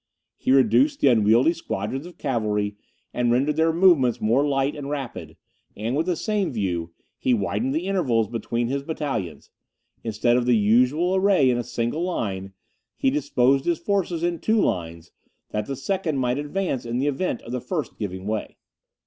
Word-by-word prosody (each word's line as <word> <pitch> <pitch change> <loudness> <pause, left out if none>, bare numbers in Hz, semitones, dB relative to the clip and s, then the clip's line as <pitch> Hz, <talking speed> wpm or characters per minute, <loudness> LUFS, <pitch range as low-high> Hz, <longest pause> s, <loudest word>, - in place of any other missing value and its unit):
He - - -5
reduced 275 - +4
the 140 - +5
unwieldy 115 +6 +4
squadrons 135 - -4
of 175 -1 -14
cavalry, 105 -6 -1 0.4
and 120 -1 +1
rendered 140 +5 +2
their 160 +1 +3
movements 160 -8 +4
more 120 +6 +2
light 140 -1 0
and 140 -2 -6
rapid; 140 -4 -6 0.4
and, 115 +5 -2
with 160 +4 0
the 180 - +1
same 205 -1 -1
view, 90 -7 -2 0.3
he 125 - +2
widened 105 +6 -1
the 165 +3 -1
intervals 135 - +1
between 115 0 -2
his 140 +3 -2
battalions. 135 - -4 0.5
Instead 115 +2 +1
of 125 -1 0
the 120 -2 +5
usual 125 - +3
array 190 -9 +4
in 120 - 0
a - - -2
single 120 +7 -2
line, 95 - -3 0.4
he 135 - +2
disposed 135 -1 +2
his 170 -1 +1
forces 175 -2 -1
in 170 -1 0
two 220 +5 +2
lines, 85 - -2 0.4
that 105 0 -2
the 135 - -3
second 165 +1 -2
might 125 +1 0
advance 150 -2 -2
in 120 0 -3
the 135 - 0
event 145 -1 -1
of 115 - -9
the 125 -1 -3
first 160 -1 -4
giving 95 -3 -5
way. 110 0 -3
130 Hz, 175 wpm, -24 LUFS, 115-160 Hz, 0.5 s, the